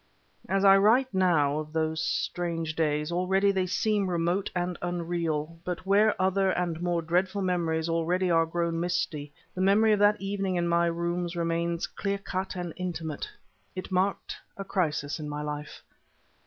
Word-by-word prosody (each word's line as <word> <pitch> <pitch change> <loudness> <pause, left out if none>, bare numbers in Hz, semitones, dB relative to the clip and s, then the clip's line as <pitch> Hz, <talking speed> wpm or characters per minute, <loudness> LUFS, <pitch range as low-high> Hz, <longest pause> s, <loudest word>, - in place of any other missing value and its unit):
As 195 +1 +2
I 195 0 +8
write, 230 +5 +4
now, 160 -6 +2
of 155 0 -7
those 160 0 0
strange 165 -3 -2
days, 150 0 0
already 190 +3 +2
they 190 -1 0
seem 200 +1 +1
remote 175 +3 0
and 175 0 -1
unreal. 165 -2 -2
But, 180 +1 -4
where 205 +2 +3
other 190 +1 +2
and 175 -3 -1
more 175 -1 0
dreadful 185 +4 0
memories 165 -3 0
already 175 +2 +1
are 165 -1 +3
grown 170 0 -1
misty, 170 -4 -2 0.2
the 185 - -3
memory 205 +3 +4
of 210 - +1
that 205 +1 +4
evening 195 -1 -2
in 175 -1 0
my 170 0 +3
rooms 170 +1 -2
remains 170 0 -1
clear 200 -1 -3
cut 190 -1 -4
and 175 -3 -4
intimate. 165 -4 -4 0.5
It 185 +1 -6
marked 190 +2 0 0.2
a 195 - -4
crisis 155 -6 -1
in 150 -1 -5
my 150 0 -4
life. 150 0 -6
175 Hz, 165 wpm, -28 LUFS, 165-190 Hz, 0.5 s, I